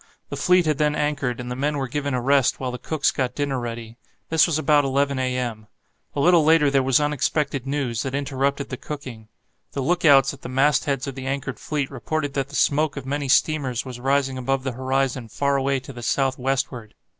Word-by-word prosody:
The - - -4
fleet 180 -1 +3
had 155 -2 0
then 150 0 +2
anchored, 145 -5 -1
and 125 0 -6
the - - -3
men 145 +3 -1
were 135 -1 -2
given 140 0 -2
a 125 - -1
rest 135 +1 +2
while 130 -1 -3
the 125 - -6
cooks 155 +1 0
got 125 -2 -2
dinner 140 -2 -1
ready. 115 -1 -6 0.3
This 160 +2 +4
was 165 -3 0
about 150 -2 +3
11 140 0 0
a.m. 125 -4 -2 0.5
A - - -1
little 170 +2 +5
later 155 -2 +4
there 135 -1 +3
was 130 0 +3
unexpected 145 -2 -1
news, 135 -5 -1
that 135 0 -3
interrupted 140 0 -1
the 130 - -5
cooking. 130 -8 -8 0.5
The 140 - -2
look 175 +5 0
outs 135 -3 +6
at 140 - -13
the - - -7
mastheads 135 0 +1
of 140 - -5
the 130 0 -7
anchored 135 -1 -3
fleet 145 -3 -3
reported 140 +3 -3
that 135 -1 -2
the 145 - -9
smoke 150 +1 +2
of 135 - -6
many 140 +1 -2
steamers 135 -4 +1
was 125 -2 -7
rising 135 0 0
above 135 +1 -1
the 130 - -2
horizon 130 -1 -1
far 140 +4 0
away 135 0 +1
to 135 +1 -10
the 120 - -9
south 135 +2 0
westward. 130 -4 -2
135 Hz, 215 wpm, -23 LUFS, 130-145 Hz, 0.5 s, outs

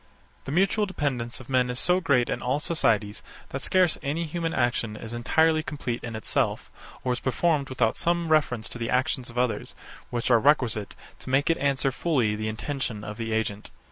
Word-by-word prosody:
The - - -4
mutual 195 +5 +2
dependence 130 -10 -2
of 130 - -12
men 125 -2 +2
is 125 - -2
so 180 +6 +3
great 140 -8 +3
in - - -2
all 130 +4 0
societies 110 -10 +1 0.3
that 135 - -4
scarce 185 0 +3
any 155 +3 -1
human 165 +1 -2
action 120 -5 0
is 115 +2 -7
entirely 155 +7 +3
complete 135 -6 -4
in 115 -1 -5
itself, 110 - -1 0.3
or 125 - +1
is 125 - -3
performed 145 +1 +1
without 125 -4 +1
some 170 -1 0
reference 125 -8 +2
to 120 - -7
the 115 - -2
actions 130 0 0
of 120 - -10
others, 125 -2 -1 0.3
which 120 +1 -1
are 120 - +6
requisite 120 -6 +2 0.2
to - - -9
make 140 +5 +3
it 165 - +1
answer 135 -1 +1
fully 125 -8 +1
the 110 +1 -3
intention 110 -1 -3
of 105 -1 -6
the 115 -1 -3
agent. 110 -2 -2
130 Hz, 195 wpm, -26 LUFS, 115-155 Hz, 0.3 s, are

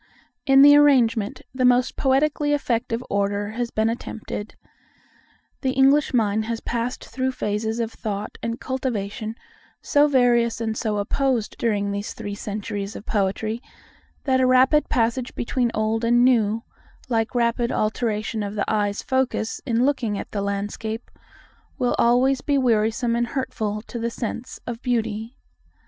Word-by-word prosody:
In 270 0 +7
the 290 0 +9
arrangement, 255 -5 +3
the 260 -1 -1
most 250 0 +3
poetically 290 +2 +2
effective 235 -4 -1
order 200 +1 -1
has 235 +1 -3
been 220 0 0
attempted. 225 -2 -5 1.1
The 260 -2 0
English 275 +2 +4
mind 215 -3 +1
has 230 0 -3
passed 240 +2 -3
through 260 0 -2
phases 220 0 -2
of 230 -1 -1
thought 210 -2 -5
and 230 +1 -3
cultivation 225 -4 -3 0.4
so 290 +1 +3
various 240 -4 +3
and 220 -1 -2
so 215 -2 -1
opposed 235 +2 0
during 205 -3 0
these 200 +1 -4
three 205 -2 -5
centuries 205 0 -5
of 210 - -8
poetry, 215 +2 -1 0.6
that 260 -2 +2
a 255 - +4
rapid 260 +4 +4
passage 240 +1 0
between 240 0 0
old 220 +1 0
and 240 +1 +4
new, 225 -3 +2 0.4
like 225 -1 -1
rapid 235 0 +1
alteration 215 0 -1
of 205 0 -4
the 205 - 0
eye's 205 -1 0
focus 260 -4 -1
in 235 +1 +2
looking 240 -7 0
at - - -7
the 205 - -2
landscape, 205 +3 -4 0.7
will 250 -3 +1
always 255 +3 +3
be 285 -1 +1
wearisome 230 -1 +1
and 240 0 0
hurtful 215 -5 -3
to 235 - -7
the 230 +1 -1
sense 235 +1 -5
of 235 -1 -5
beauty. 225 -1 -2
230 Hz, 150 wpm, -23 LUFS, 215-255 Hz, 1.1 s, the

